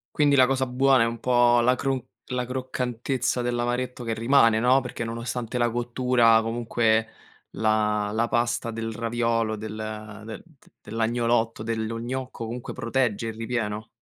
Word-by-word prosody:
Quindi 145 -2 +4
la 130 - +7
cosa 130 0 0
buona 130 -1 +3
è - - +1
un 115 0 -4
po' 120 -1 +4
la 125 +2 +4
crun 135 0 -1 0.3
la 125 0 -2
croccantezza 125 0 -2
dell'amaretto 120 +1 -2
che 115 - -2
rimane, 115 -1 +4
no, 130 +3 +4
perché 120 -1 -5
nonostante 115 +1 -4
la 120 0 +2
cottura 120 -1 +3
comunque 115 -1 +1 0.4
la 105 -1 +1
la 115 +2 0
pasta 120 0 0
del 115 0 -4
raviolo 115 -1 -1
del 110 0 -6 0.5
de 110 -2 -6
d 160 -6 -25 0.2
dell'agnolotto, 115 0 0
dello 115 0 -3
gnocco, 125 0 -5
comunque 120 +2 -6
protegge 115 -2 -1
il 110 - -5
ripieno? 115 -1 -3
120 Hz, 150 wpm, -25 LUFS, 115-125 Hz, 0.5 s, la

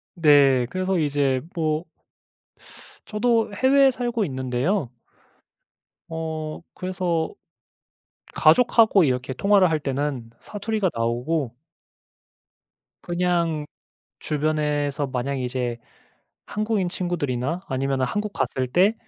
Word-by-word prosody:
네. 140 -6 +5
그래서 185 0 -1
이제 140 -4 +1
뭐 155 0 -1 1.2
저도 225 0 +1
해외에 270 +4 +4
살고 240 -3 -1
있는데요. 130 - -1 1.2
어. 160 -1 -4
그래서 180 -3 -2 1.0
가족하고 225 -6 +5
이렇게 125 -1 -1
통화를 200 +1 +4
할 155 - +1
때는 135 -4 -3
사투리가 205 -2 -2
나오고 120 +3 -1 1.5
그냥 175 -3 0 0.5
주변에서 150 -1 -1
만약 130 +2 -2
이제 125 -2 -2 0.7
한국인 210 -3 -1
친구들이나 170 -3 -2
아니면은 135 0 -1
한국 210 +7 -3
갔을 130 -8 -1
때 185 - +3
155 Hz, 215 characters per minute, -24 LUFS, 135-190 Hz, 1.5 s, 네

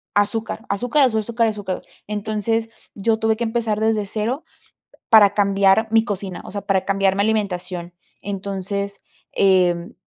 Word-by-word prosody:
azúcar, 220 +2 0
azúcar, 245 +8 +2
azúcar, 230 0 0
azúcar. 205 -4 -3 0.3
Entonces, 215 +2 -1 0.3
yo 220 +2 +1
tuve 220 -1 +1
que 235 - -2
empezar 225 -2 -1
desde 220 -1 +1
cero, 225 +8 -3 0.7
para 210 -3 +7
cambiar 200 +1 +3
mi 225 0 +5
cocina, 195 -4 -5
o - - -9
sea, 205 - -3
para 190 -1 +1
cambiar 195 -1 +2
mi 200 - +2
alimentación. 180 -5 -2 0.3
Entonces, 200 0 -4 0.3
eh, 180 -3 +2
205 Hz, 135 wpm, -21 LUFS, 195-220 Hz, 0.7 s, para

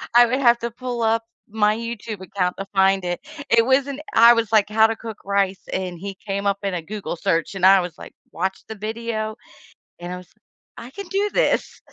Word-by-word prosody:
I 240 - +9
would 255 +3 0
have 240 -2 +4
to 235 0 -4
pull 245 -1 -5
up 225 +1 +2 0.3
my 210 0 +2
YouTube 230 -3 -6
account 185 -1 -2
to 195 - -4
find 195 -1 +3
it. 175 0 -2 0.3
It 230 0 +5
wasn't 275 +2 +1
I 235 +1 +8
was, 230 -2 -1
like, 215 -1 +4
"How 220 +1 +5
to 225 - -2
cook 225 -2 -8
rice." 195 -1 0
And 185 -2 -3
he 195 0 -6
came 200 0 -4
up 200 0 +1
in 195 -2 -1
a 175 - -2
Google 200 +1 -5
search, 165 +3 -1
and 185 -1 +1
I 195 0 +8
was, 175 -2 -7
like, - - -11 0.2
"Watch 190 +2 -2
the 220 - -7
video." 220 0 -4 0.7
And 175 +1 -6
I - - -4
was 180 -1 -12 0.5
"I 240 - -9
can 400 +5 -8
do 405 +1 0
this." - - 0
215 Hz, 215 wpm, -22 LUFS, 190-230 Hz, 0.7 s, I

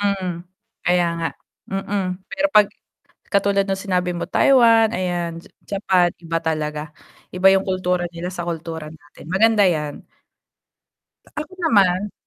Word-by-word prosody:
Mm, 200 -2 0 0.6
kaya 175 0 +3
nga. 165 - -1 0.4
Mm. 195 +1 -2 0.3
Pero 285 +1 +1
'pag 210 -1 +7 0.6
katulad 200 -1 +2
no'ng 195 -1 -3
sinabi 180 -2 0
mo, - - -3
Taiwan 230 -4 +5
ayan, 175 -2 -3
Ja - - -18 0.3
Japan 185 -3 +3
iba 165 0 -1
talaga, 155 -2 -2 0.5
iba 185 +1 +4
'yong 195 0 +2
kultura 180 -1 0
nila 170 +2 -5
sa 175 -2 -5
kultura 165 -2 -5
natin, 145 -1 -16
maganda 210 +4 +4
'yan. 150 -5 -1 1.3
Ako 305 +5 -5
naman 200 - +2
185 Hz, 130 wpm, -21 LUFS, 170-200 Hz, 1.3 s, pag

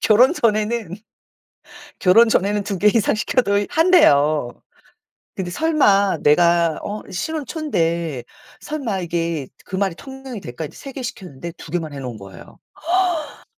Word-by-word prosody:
결혼 240 +7 +5
전에는, 215 - 0 1.0
결혼 225 +6 +5
전에는 205 -1 +1
2 200 -2 -3
개 210 - +4
이상 210 0 +2
시켜도 205 -3 +1
한대요. 155 - +4 0.9
근데 180 -2 -4
설마 200 - +2
내가 170 +1 +3
어 210 +1 -5
신혼 310 - -3
초인데 170 - -2 0.4
설마 260 -11 -3
이게 165 -5 -2 0.2
그 190 - -5
말이 190 -2 0
통용이 265 -4 -9
될까 125 0 -7
이제 150 - -9
3 275 - -9
개 265 - -6
시켰는데 175 - -7
2 - - -11
개만 165 -4 -2
해 140 - -7
놓은 125 -4 -6
거예요. 95 -3 -13 0.7
허. - - -17
195 Hz, 260 characters per minute, -20 LUFS, 165-235 Hz, 1.0 s, 결혼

